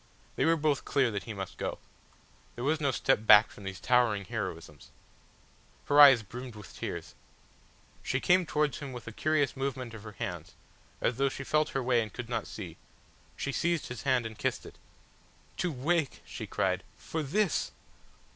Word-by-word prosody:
They -, -, +1 dB
were 165 Hz, +1 st, +4 dB
both 150 Hz, -2 st, +1 dB
clear 130 Hz, -4 st, +2 dB
that 100 Hz, -3 st, -4 dB
he 115 Hz, -, -5 dB
must 95 Hz, -2 st, -6 dB
go. -, -, -2 dB, 0.8 s
There 120 Hz, -, -5 dB
was 155 Hz, +3 st, +1 dB
no 140 Hz, -, +2 dB
step 125 Hz, -3 st, +1 dB
back 105 Hz, -1 st, +8 dB
from 100 Hz, -, -12 dB
these 95 Hz, -2 st, -5 dB
towering 115 Hz, -4 st, +2 dB
heroisms. -, -, -6 dB, 1.0 s
Her 145 Hz, +1 st, +6 dB
eyes 135 Hz, -5 st, +9 dB
brimmed 125 Hz, +3 st, -8 dB
with 105 Hz, -1 st, -11 dB
tears. -, -, -5 dB, 0.9 s
She 130 Hz, -, -1 dB
came 180 Hz, +3 st, +3 dB
towards 150 Hz, -2 st, 0 dB
him 140 Hz, -3 st, -6 dB
with 120 Hz, -, -8 dB
a 115 Hz, -, -6 dB
curious 145 Hz, +4 st, +1 dB
movement 130 Hz, -3 st, -3 dB
of 110 Hz, -, -9 dB
her 105 Hz, 0 st, -10 dB
hands, -, -, -6 dB, 0.5 s
as 120 Hz, -, +1 dB
though 135 Hz, 0 st, +2 dB
she 135 Hz, -, -6 dB
felt 150 Hz, +2 st, +1 dB
her 135 Hz, -, -1 dB
way 120 Hz, -1 st, +3 dB
and 110 Hz, -2 st, -5 dB
could 120 Hz, -2 st, -7 dB
not 120 Hz, -, -2 dB
see; -, -, -8 dB, 0.6 s
she 140 Hz, -, -3 dB
seized 170 Hz, +2 st, 0 dB
his 125 Hz, -3 st, -6 dB
hand 130 Hz, -2 st, +2 dB
and 110 Hz, -1 st, -7 dB
kissed -, -, -1 dB
it. -, -, -13 dB, 0.8 s
"To 180 Hz, -, 0 dB
wake," 150 Hz, +2 st, -1 dB
she -, -, -7 dB
cried, -, -, 0 dB
"for 160 Hz, -, -4 dB
this!" 175 Hz, +6 st, 0 dB
130 Hz, 185 wpm, -30 LUFS, 115-150 Hz, 1.0 s, eyes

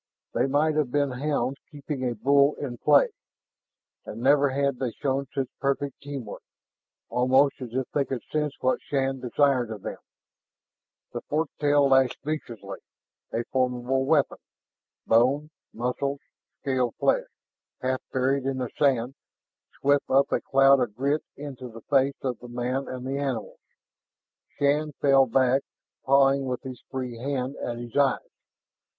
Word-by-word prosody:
They 125 Hz, -, +2 dB
might 150 Hz, +3 st, +2 dB
have 150 Hz, -4 st, +1 dB
been 145 Hz, +1 st, +1 dB
hounds 135 Hz, -1 st, -1 dB
keeping 145 Hz, -2 st, -5 dB
a 120 Hz, -, -4 dB
bull 140 Hz, +5 st, +4 dB
in 120 Hz, -5 st, -6 dB
play. 145 Hz, -1 st, +5 dB, 0.9 s
And 110 Hz, -, -8 dB
never 140 Hz, +3 st, +4 dB
had 140 Hz, -1 st, 0 dB
they 130 Hz, -, -1 dB
shown 140 Hz, -1 st, -1 dB
such 135 Hz, -2 st, -2 dB
perfect 140 Hz, 0 st, -2 dB
team 140 Hz, -3 st, -6 dB
work, 105 Hz, -, -8 dB, 0.7 s
almost 130 Hz, +3 st, +3 dB
as 120 Hz, -2 st, -7 dB
if 130 Hz, 0 st, 0 dB
they 140 Hz, -2 st, +1 dB
could 130 Hz, -3 st, -4 dB
sense 150 Hz, -2 st, 0 dB
what 130 Hz, -, +1 dB
Shann 135 Hz, -1 st, -1 dB
desired 130 Hz, -1 st, +2 dB
of 110 Hz, -3 st, -7 dB
them. -, -, -5 dB, 1.1 s
That -, -, -5 dB
forked 155 Hz, 0 st, -2 dB
tail 145 Hz, -1 st, +4 dB
lashed 135 Hz, -2 st, +3 dB
viciously, 115 Hz, -10 st, -5 dB, 0.5 s
a 115 Hz, -, -1 dB
formidable 130 Hz, +1 st, 0 dB
weapon. 145 Hz, -2 st, +2 dB, 0.7 s
Bone, 135 Hz, +7 st, +3 dB, 0.2 s
muscles, 135 Hz, +4 st, -2 dB, 0.4 s
scaled 130 Hz, -3 st, 0 dB
flesh, -, -, +1 dB, 0.6 s
half 130 Hz, 0 st, 0 dB
buried 135 Hz, +1 st, +1 dB
in 135 Hz, -1 st, -1 dB
the 125 Hz, -2 st, -3 dB
sand, 130 Hz, -3 st, +2 dB, 0.7 s
swept 140 Hz, 0 st, +2 dB
up 135 Hz, +1 st, +3 dB
a -, -, +1 dB
cloud 135 Hz, 0 st, +5 dB
of 120 Hz, -5 st, -1 dB
grit 140 Hz, +5 st, 0 dB, 0.2 s
into 135 Hz, -3 st, -7 dB
the 115 Hz, 0 st, -11 dB
face 135 Hz, +1 st, +2 dB
of 130 Hz, -3 st, -2 dB
the 125 Hz, -, -10 dB
man 125 Hz, +3 st, -2 dB
and 130 Hz, 0 st, -6 dB
the 135 Hz, +1 st, -2 dB
animals. 130 Hz, -6 st, -3 dB, 1.0 s
Shann 150 Hz, +1 st, +1 dB
fell 135 Hz, -1 st, +4 dB
back, 130 Hz, +2 st, +3 dB, 0.4 s
pawing 135 Hz, 0 st, +4 dB
with 125 Hz, -1 st, -3 dB
his 130 Hz, -2 st, -8 dB
free 125 Hz, -3 st, -5 dB
hand 135 Hz, 0 st, -2 dB
at 120 Hz, -1 st, -4 dB
his 120 Hz, -1 st, -8 dB
eyes. 140 Hz, -2 st, +4 dB
135 Hz, 150 wpm, -26 LUFS, 125-140 Hz, 1.1 s, play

